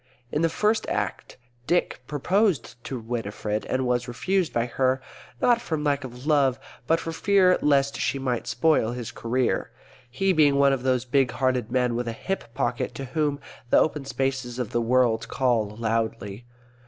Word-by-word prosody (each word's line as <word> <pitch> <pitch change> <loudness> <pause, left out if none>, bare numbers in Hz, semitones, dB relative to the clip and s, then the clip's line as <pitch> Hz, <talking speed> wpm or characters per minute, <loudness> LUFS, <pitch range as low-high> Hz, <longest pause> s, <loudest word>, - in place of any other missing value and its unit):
In 150 - 0
the 165 - +3
First 210 +6 +1
Act - - -3 0.3
Dick 175 -6 +1
proposed 155 - 0
to 130 - -4
Winifred 110 -2 -3
and 130 0 0
was 125 0 0
refused 175 - 0
by 120 0 0
her, 130 +2 +1 0.4
not 240 -1 +3
from 160 -9 -3
lack 145 -2 +1
of 125 0 -9
love, 140 -4 +3 0.3
but 165 +1 +3
for 165 - -4
fear 185 +1 +3
lest 140 -1 +2
she - - 0
might 130 -3 -2
spoil 150 -8 +2
his 120 -2 -5
career, 120 +1 -1 0.4
he 190 +10 +1
being 150 -4 +4
one 140 0 +4
of 135 - -1
those 130 -1 +1
big 130 0 +2
hearted 130 -3 -1
men 125 -1 +1
with 120 0 -2
a 115 - -2
hip 190 +2 -4
pocket 120 +1 -1
to 135 - -5
whom 150 -3 0 0.3
the - - +5
open 150 -2 +2
spaces 135 -2 -2
of 125 -4 -3
the 120 - +1
world 115 -1 +2
call 120 -5 +1
loudly. 110 0 -3
130 Hz, 175 wpm, -25 LUFS, 120-150 Hz, 0.4 s, the